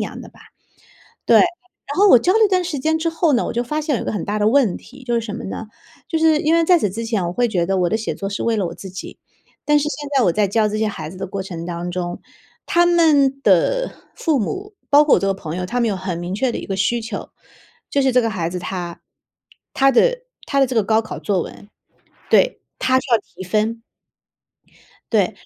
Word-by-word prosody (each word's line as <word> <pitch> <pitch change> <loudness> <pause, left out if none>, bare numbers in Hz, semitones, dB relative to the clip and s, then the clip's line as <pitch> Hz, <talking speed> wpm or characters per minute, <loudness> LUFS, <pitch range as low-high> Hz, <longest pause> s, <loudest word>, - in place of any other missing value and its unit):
样 - - -6
的 - - -10
吧。 - - -20 0.9
对， - - +6
然 - - +6 0.5
后 400 +3 +5
我 250 - +8
教 360 +9 +2
了 445 - +3
一 - - 0
段 370 -1 +2
时 345 -4 -3
间 315 +4 0
之 325 - -1
后 325 -1 +1
呢， 240 - +2
我 - - -4
就 240 - 0
发 300 +6 -2
现 300 -2 -1
有 - - -3
一 - - -6
个 - - -2
很 210 - -3
大 210 +1 -2
的 210 +1 +3
问 245 -6 +3
题， 265 0 -13
就 240 - -1
是 235 - +1
什 215 -2 -6
么 230 - -6
呢？ 215 +3 -6 0.4
就 325 - 0
是 315 -1 +4
因 315 +1 +2
为 335 -1 +3
在 360 0 +5
此 210 - 0
之 225 +5 -5
前 220 -5 -1
我 170 - -2
会 245 +6 +1
觉 180 -6 0
得 195 +1 0
我 180 -1 +2
的 215 - +1
写 225 0 -2
作 195 - -5
是 200 - -4
为 230 -1 +1
了 195 - 0
我 - - -7
自 190 - -9
己， 185 +1 -9 0.5
但 295 0 +3
是 - - -1
现 295 -1 -5
在 260 - +4
我 175 - +2
在 205 +1 +1
教 215 +1 +2
这 210 0 -3
些 220 - +1
孩 200 -7 -4
子 185 - -11
的 190 - -5
过 195 +1 -5
程 170 -3 -7
当 175 0 -4
中， 175 -1 -4 0.4
他 345 0 +3
们 295 -6 +3
的 275 - +3 0.3
父 315 -5 +1
母， 390 - -4 0.2
包 290 +1 +6
括 295 - +5
我 - - +1
这 195 - 0
个 195 - +2
朋 165 -4 -6
友， 180 0 -3
他 245 +7 -2
们 235 - +2
有 200 - -1
很 185 -2 -4
明 175 +2 -4
确 245 +4 0
的 - - -4
一 - - -6
个 195 - -3
需 200 +5 +1
求， 225 -2 -6 0.6
就 280 - +1
是 265 -1 +2
这 250 0 +4
个 225 - 0
孩 175 -5 -2
子 180 +1 -4
他 175 -2 -5 0.7
他 275 0 +4
的 - - +2 0.2
他 275 - +1
的 270 - +5
这 250 - -4
个 220 - +3
高 220 +2 +2
考 220 - -7
作 195 -4 0
文 205 - -12 0.6
对， - - +3 0.2
他 260 0 +3
是 260 - -6
要 230 - +6
提 190 - -11
分。 215 +4 -1 1.3
对， - - +5
然 - - -3
230 Hz, 280 characters per minute, -20 LUFS, 195-290 Hz, 1.3 s, 我